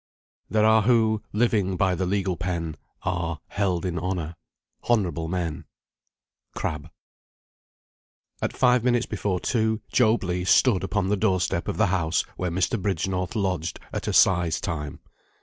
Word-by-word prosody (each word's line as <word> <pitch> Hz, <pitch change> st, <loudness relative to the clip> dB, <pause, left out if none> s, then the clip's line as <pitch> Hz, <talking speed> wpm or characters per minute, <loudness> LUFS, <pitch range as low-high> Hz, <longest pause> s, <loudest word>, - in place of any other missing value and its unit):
"There 110 Hz, 0 st, +3 dB
are 110 Hz, 0 st, +5 dB
who, 110 Hz, -2 st, +3 dB
living 105 Hz, -4 st, +1 dB
by 95 Hz, -1 st, +2 dB
the 90 Hz, +1 st, -1 dB
legal 95 Hz, -1 st, 0 dB
pen, 85 Hz, -2 st, -3 dB, 0.3 s
Are 85 Hz, -4 st, -2 dB
held 95 Hz, -3 st, -1 dB
in 90 Hz, -2 st, -2 dB
honour 85 Hz, -2 st, -3 dB, 0.5 s
honourable 90 Hz, -9 st, +1 dB
men." 85 Hz, -3 st, -3 dB, 0.9 s
CRABBE. 75 Hz, -2 st, -4 dB, 1.5 s
At -, -, -2 dB
five 125 Hz, -2 st, +4 dB
minutes 120 Hz, -1 st, +2 dB
before 100 Hz, -3 st, -2 dB
two, 110 Hz, -1 st, 0 dB
Job 115 Hz, -3 st, +3 dB
Legh 90 Hz, 0 st, -2 dB
stood 100 Hz, -6 st, +4 dB
upon 95 Hz, -1 st, -1 dB
the 105 Hz, -, +2 dB
door 95 Hz, -2 st, +2 dB
step 85 Hz, -1 st, -1 dB
of -, -, -2 dB
the 110 Hz, -, +4 dB
house 85 Hz, -3 st, +1 dB
where 90 Hz, -, -2 dB
Mr. 95 Hz, +5 st, 0 dB
Bridgenorth 95 Hz, +1 st, -2 dB
lodged 95 Hz, -6 st, -1 dB
at -, -, -4 dB
Assize 90 Hz, -4 st, +3 dB
time. 75 Hz, -5 st, -4 dB
95 Hz, 145 wpm, -25 LUFS, 85-110 Hz, 1.5 s, are